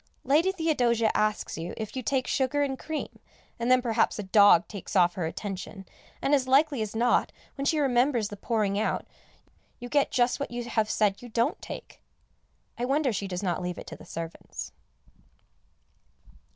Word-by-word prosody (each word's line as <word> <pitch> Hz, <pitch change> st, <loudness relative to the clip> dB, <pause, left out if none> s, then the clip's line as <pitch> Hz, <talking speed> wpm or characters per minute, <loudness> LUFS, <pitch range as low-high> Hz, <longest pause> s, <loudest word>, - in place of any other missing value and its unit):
Lady 320 Hz, +7 st, +3 dB
Theodosia 245 Hz, -, +2 dB
asks 215 Hz, -5 st, 0 dB
you 165 Hz, +2 st, -5 dB
if 220 Hz, +1 st, -5 dB
you 260 Hz, -, -2 dB
take 255 Hz, +2 st, 0 dB
sugar 280 Hz, +2 st, +1 dB
and 270 Hz, -2 st, -2 dB
cream, 315 Hz, -1 st, -5 dB, 0.4 s
and 235 Hz, +1 st, -1 dB
then 255 Hz, -1 st, +5 dB
perhaps 230 Hz, -2 st, +1 dB
a 210 Hz, -, -3 dB
dog 200 Hz, -3 st, +6 dB
takes 200 Hz, -1 st, -8 dB
off 175 Hz, -2 st, +5 dB
her 175 Hz, -4 st, -2 dB
attention, 195 Hz, +2 st, -6 dB, 0.4 s
and 275 Hz, -, +2 dB
as 265 Hz, -3 st, +3 dB
likely 275 Hz, -1 st, +3 dB
as 215 Hz, 0 st, -4 dB
not, 240 Hz, +2 st, +2 dB, 0.2 s
when 275 Hz, -, -4 dB
she 310 Hz, -, +2 dB
remembers 250 Hz, -5 st, +2 dB
the 205 Hz, -, -7 dB
pouring 205 Hz, -1 st, 0 dB
out, 220 Hz, -, -1 dB, 0.7 s
you 245 Hz, -1 st, -7 dB
get 285 Hz, 0 st, +2 dB
just 245 Hz, +1 st, +1 dB
what 280 Hz, -, -3 dB
you 240 Hz, 0 st, -4 dB
have 220 Hz, -2 st, 0 dB
said 205 Hz, -2 st, +1 dB
you 245 Hz, -, -10 dB
don't 230 Hz, +1 st, 0 dB
take. -, -, -9 dB, 0.8 s
I -, -, -1 dB
wonder 275 Hz, -1 st, +1 dB
she 200 Hz, 0 st, -3 dB
does 180 Hz, 0 st, -4 dB
not 180 Hz, -2 st, -1 dB
leave 180 Hz, -1 st, -4 dB
it -, -, -8 dB
to -, -, -8 dB
the -, -, -14 dB
servants. 165 Hz, 0 st, -7 dB
235 Hz, 180 wpm, -27 LUFS, 205-270 Hz, 0.8 s, dog